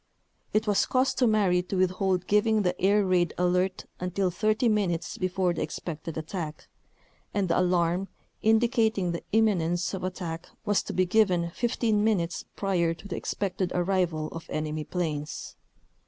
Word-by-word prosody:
It 215 +1 +1
was 205 -2 +2
cus 255 +1 +2
tomary 210 -7 +3
to 195 - -2
withhold 185 0 +1
giving 210 +1 +3
the 180 -1 -1
air 200 +2 +4
raid 180 -3 +2
"alert" 180 +1 +1
until 180 +1 0
30 215 +6 +1
minutes 195 -6 0
before 185 -1 0
the - - -4
expected 160 -1 -5
attack, 160 -1 -5 0.7
and 200 -2 +1
the 170 - +2
"alarm" 180 +1 +1 0.3
indicating 220 -4 +2
the 170 - -4
imminence 185 -6 +2
of 190 - -4
at 185 0 -3
tack 165 -2 -5 0.2
was 205 -1 +2
to - - -6
be 185 - +2
given 180 -4 +2
15 225 0 +1
minutes 185 -6 0
prior 175 -4 +1
to 200 - -12
the - - -4
ex - - -4
pected 190 -2 -1
arrival 175 -4 0
of 165 0 -9
enemy 155 0 -3
planes. 155 -5 -4
185 Hz, 155 wpm, -27 LUFS, 170-205 Hz, 0.7 s, air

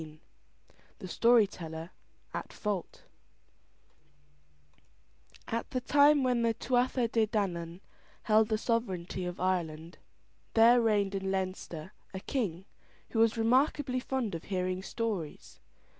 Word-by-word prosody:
THE 185 - -8
STORY 230 +4 +5
TELLER 165 -3 -8 0.4
AT - - -5
FAULT 205 -5 -4 2.4
At 230 0 -3
the 255 - -1
time 285 +2 +5
when 250 -2 +2
the 230 -1 +1
Tuatha 250 0 +1
De 225 -1 +1
Dannan 180 -5 -2 0.4
held 215 0 +4
the 215 - +1
sovereignty 190 -6 -2
of 180 0 -5
Ireland, 170 -3 -2 0.6
there 235 +2 +7
reigned 205 -3 +2
in 195 -1 -2
Leinster 185 -2 -4 0.2
a - - -3
king, 190 - -3 0.5
who 225 - -1
was 225 +1 +4
remarkably 255 +3 +2
fond 250 -5 -2
of 165 - -6
hearing 185 -1 -2
stories. 200 -7 -4
210 Hz, 115 wpm, -31 LUFS, 185-235 Hz, 2.4 s, there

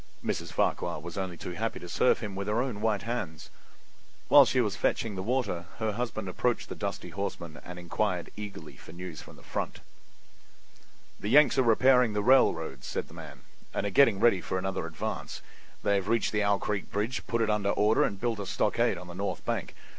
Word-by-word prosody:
Mrs. - - -2
Farquhar - - 0
was 85 +2 -8
only 95 -3 -3
too 90 - -6
happy 110 +5 -3
to 90 - -9
serve 125 - +2
him 105 -3 -4
with 100 +1 -4
her 105 +2 +1
own 125 -5 -2
white 110 -2 +1
hands. 105 -9 -4 0.8
While 140 -2 +9
she 130 - +1
was 105 -5 +1
fetching 115 -2 0
the 95 - -4
water 100 -6 -1
her 110 -1 0
husband 110 -2 -3
approached 120 +6 -1
the - - -5
dusty - - -4
horseman 85 -5 -5
and 90 0 -8
inquired 90 +1 -2
eagerly 100 -7 -8
for 80 - -13
news 85 -2 -7
from - - -13
the - - -17
front. - - -4 1.4
"The 105 - -3
Yanks 145 +2 +6
are - - +7
repairing 125 0 +5
the 105 0 0
railroads," 80 - +3
said - - -3
the - - -14
man, - - -10 0.3
"and - - -1
are 100 - -1
getting 115 -3 +5
ready 105 -5 +4
for 95 - -2
another 95 -2 -2
advance. 80 -2 -5 0.4
They 100 - +2
have 95 - -3
reached 115 +1 +2
the 105 - +1
Owl 100 0 +3
Creek 105 0 -3
bridge, 110 +5 -2
put 115 -1 +1
it 110 - 0
in 105 -1 0
order 105 +2 +3
and 100 - -1
built 115 -2 -1
a 100 - -4
stockade 115 +2 +1
on 90 - -8
the 90 - -8
north 100 +3 -3
bank. - - -2
105 Hz, 205 wpm, -29 LUFS, 90-115 Hz, 1.4 s, While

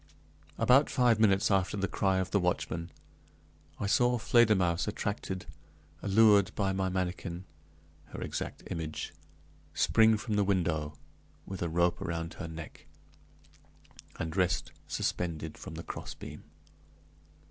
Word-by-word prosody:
About 135 +4 +5
five 120 -4 +3
minutes 100 -2 +4
after 95 +1 +1
the 100 0 0
cry 95 +1 +1
of 95 0 -1
the 100 - +3
watchman, 85 -2 -1 0.9
I - - -2
saw 120 +4 +3
Fledermausse 105 -8 +3
attracted, 100 -3 -3 0.6
allured 105 -1 +5
by 95 -2 0
my 95 0 0
manikin 90 -1 -3 0.6
(her - - -9
exact - - -5
image), 80 -2 -4 0.6
spring 110 -1 +4
from 105 -1 -2
the 105 - +4
window, 80 -6 0 0.5
with 95 -2 -7
a 85 - 0
rope 85 +1 +1
around 85 0 -3
her 85 - -6
neck, 80 0 -9 1.3
and 80 0 -4
rest 90 -2 +1 0.2
suspended 80 -3 -2
from 80 - -9
the 85 - -6
crossbeam. - - -8
95 Hz, 125 wpm, -31 LUFS, 85-105 Hz, 1.3 s, About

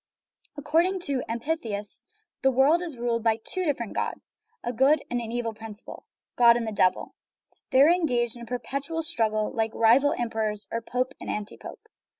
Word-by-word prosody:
According 335 +6 +1
to 280 -5 -1
the 250 - -5
amphitheists, 230 -5 -4 0.4
the 265 - +4
world 270 +6 +4
is 330 -7 -6
ruled 235 -1 -1
by 225 -1 +3
two 360 +11 -4
different 250 -8 -2
gods, - - -4 0.3
a 240 - -2
good 275 +5 +3
and 245 0 0
an 225 -1 -6
evil 235 -1 -2
principle, 220 -1 -10 0.3
God 235 -1 +6
and 235 - -2
the 220 - -3
Devil. 185 -3 +1 0.6
They 260 +1 +6
are 300 - +6
engaged 250 -9 +1
in 240 - -11
a - - -7
perpetual 275 +6 -3
strug 235 -9 +1
gle, 215 0 -1
like 225 -1 -1
rival 250 +6 +4
emperors, 220 -3 -2
or 230 - -2
pope 255 +3 -2
and - - -6
anti 210 0 -4
pope. - - -11
240 Hz, 185 wpm, -26 LUFS, 225-285 Hz, 0.6 s, God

